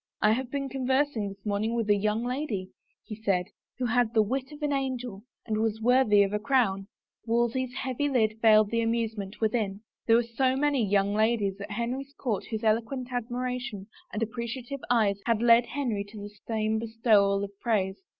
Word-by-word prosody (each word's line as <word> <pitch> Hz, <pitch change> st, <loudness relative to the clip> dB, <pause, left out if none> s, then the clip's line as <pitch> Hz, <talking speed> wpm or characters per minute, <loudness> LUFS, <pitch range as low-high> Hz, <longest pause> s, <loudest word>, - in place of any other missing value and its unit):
" -, -, -46 dB
I 215 Hz, -, +6 dB
have 245 Hz, +2 st, -1 dB
been 275 Hz, 0 st, -2 dB
conversing 260 Hz, -4 st, 0 dB
this 195 Hz, +1 st, -13 dB
morning 215 Hz, +3 st, 0 dB
with 230 Hz, -2 st, -1 dB
a 205 Hz, -, +5 dB
young 210 Hz, +3 st, 0 dB
lady," 245 Hz, -8 st, -3 dB, 0.5 s
said 185 Hz, -4 st, +1 dB
he, -, -, -36 dB
" -, -, -65 dB
who 255 Hz, -, -1 dB
had 240 Hz, -1 st, +1 dB
the 220 Hz, -, +6 dB
wit 265 Hz, +6 st, -3 dB
of 300 Hz, 0 st, -10 dB
an 290 Hz, -1 st, +1 dB
angel 250 Hz, -6 st, -3 dB
— -, -, -59 dB
and 215 Hz, -2 st, -1 dB
was 220 Hz, 0 st, 0 dB
worthy 225 Hz, -3 st, +5 dB
of 200 Hz, +1 st, -2 dB
a 210 Hz, -, +1 dB
crown." 210 Hz, -5 st, +1 dB, 0.4 s
Wolsey's 240 Hz, +2 st, 0 dB
heavy 265 Hz, +2 st, -1 dB
lid 220 Hz, -5 st, +1 dB
veiled 215 Hz, -2 st, +5 dB
the 230 Hz, 0 st, +1 dB
amusement 225 Hz, -3 st, -2 dB
within. 215 Hz, -3 st, -1 dB, 0.3 s
There 225 Hz, -, +6 dB
were 240 Hz, -, +4 dB
so 255 Hz, +3 st, 0 dB
many 285 Hz, -2 st, +1 dB
young 200 Hz, 0 st, +2 dB
ladies 210 Hz, -2 st, +1 dB
at 200 Hz, -, -6 dB
Henry's 250 Hz, +6 st, -3 dB
court 220 Hz, -7 st, -2 dB
whose 220 Hz, -1 st, -5 dB
eloquent 235 Hz, +4 st, 0 dB
admiration 245 Hz, -3 st, -3 dB, 0.3 s
and 215 Hz, +2 st, -2 dB
appreciative 235 Hz, +4 st, -5 dB
eyes 210 Hz, -5 st, +2 dB
had 230 Hz, -2 st, +2 dB
led 235 Hz, 0 st, +6 dB
Henry 240 Hz, -6 st, -2 dB
to 210 Hz, +1 st, -11 dB
the 205 Hz, 0 st, -8 dB
same 220 Hz, -1 st, 0 dB
bestowal 220 Hz, -3 st, +2 dB
of 200 Hz, -, -5 dB
praise! 195 Hz, -5 st, 0 dB
225 Hz, 195 wpm, -28 LUFS, 210-250 Hz, 0.5 s, I